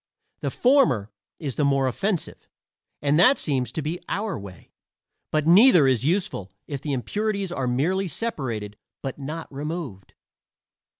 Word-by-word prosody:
The - - -2
former 150 - +3 0.3
is 140 -5 -5
the 150 - +2
more 140 -1 +2
offensive, 180 - -2 0.6
and 145 +2 +3
that 255 +10 +6
seems 130 -5 -1
to 155 - -3
be 165 +4 -3
our 205 0 -2
way; 95 -3 -12 0.6
but 155 -1 0
neither 180 - +7
is 130 -3 +2
useful 170 - -1
if 140 -3 -5
the 150 - -3
impurities 200 - -2
are 135 -7 -2
merely 175 +11 0
separated 120 - -3 0.3
but 135 0 -5
not 155 +4 -5
removed. 145 - -6
150 Hz, 140 wpm, -24 LUFS, 130-190 Hz, 0.6 s, neither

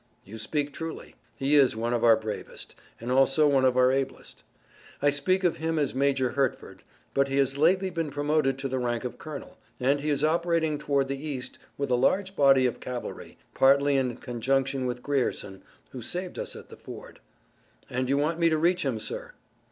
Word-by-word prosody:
"You 110 +3 -9
speak 145 +6 -2
truly. 165 +1 -7 0.2
He 135 +2 0
is 140 -5 +5
one 115 +2 -1
of 120 - 0
our 115 -1 +7
bravest, 110 -1 -7 0.3
and 120 +2 -4
also 135 +3 +4
one 135 -2 +3
of 130 -1 +3
our 130 0 +5
ablest. 135 0 -3 0.6
I 145 0 +3
speak 185 +7 +1
of 175 -2 +2
him 160 0 -1
as 145 -3 0
Major 135 -1 +1
Hertford, 135 -3 -2 0.3
but 140 0 +2
he 135 0 -2
has 135 -1 +2
lately 185 +6 +2
been 165 -3 -2
promoted 145 -1 0
to 135 0 -3
the 130 0 -2
rank 120 -2 -1
of 125 - -6
colonel, 155 -3 -9 0.2
and 140 +3 +2
he 150 - -2
is 145 -1 +1
operating 165 -1 +1
toward 140 -2 0
the 140 +1 -5
East 140 -5 -5 0.2
with 140 -2 -2
a - - +4
large 190 +10 +1
body 135 -4 +5
of 125 - -1
cavalry, 125 -1 -7 0.2
partly 140 +1 +4
in 130 -3 0
conjunction 135 +2 -1
with 125 0 -4
Grierson, 125 -8 -2 0.3
who 130 - -7
saved 180 +9 -5
us - - -5
at - - -11
the - - -12
ford." - - -11 0.7
"And 130 +1 -2
you 140 - +2
want 155 +4 0
me 170 -1 +4
to 160 - +1
reach 175 +3 +2
him, 135 -5 -1
sir!" - - -5
140 Hz, 200 wpm, -27 LUFS, 130-155 Hz, 0.7 s, our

